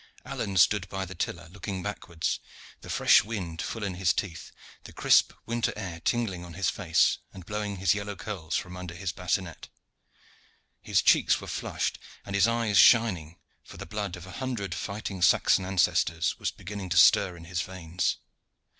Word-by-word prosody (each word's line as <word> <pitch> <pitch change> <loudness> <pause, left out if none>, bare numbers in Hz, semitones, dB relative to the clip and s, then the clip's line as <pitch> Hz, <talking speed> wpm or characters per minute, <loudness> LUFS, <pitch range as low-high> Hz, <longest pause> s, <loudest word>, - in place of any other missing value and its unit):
Alleyne 95 -2 -3
stood 95 +1 +4
by 95 0 -3
the 95 - -8
tiller, 85 -1 -4
looking 95 0 -6
backwards, 85 -5 -3 0.4
the - - -12
fresh - - +5
wind 95 -7 -5
full 115 - -4
in 100 -2 -2
his 90 -1 +2
teeth, 85 -5 -4 0.3
the - - -10
crisp - - +4
winter 115 0 0
air 90 -6 -5
tingling 95 -2 -1
on 85 -2 -10
his 95 -1 +1
face 85 -5 +2
and 95 -3 -11
blowing 105 0 -3
his 95 -2 +2
yellow 100 0 -4
curls 95 -4 -5
from 90 -3 -3
under 90 -1 -7
his 90 0 -3
bassinet. 90 -1 -3 1.1
His - - +1
cheeks - - +4
were - - -9
flushed - - -3 0.3
and 100 - -7
his 100 +1 +4
eyes 115 -3 +2
shining, 90 -9 +5 0.3
for - - -13
the - - -7
blood 100 0 -4
of 90 0 -10
a 95 - -10
hundred 115 -6 -4
fighting 100 0 -5
Saxon 90 +2 +4
ancestors 85 -2 +1
was - - -1
beginning 100 -1 -7
to 85 - 0
stir 85 +1 +6
in 85 - -11
his 85 0 -2
veins. 90 -1 -2
95 Hz, 175 wpm, -28 LUFS, 85-105 Hz, 1.1 s, stir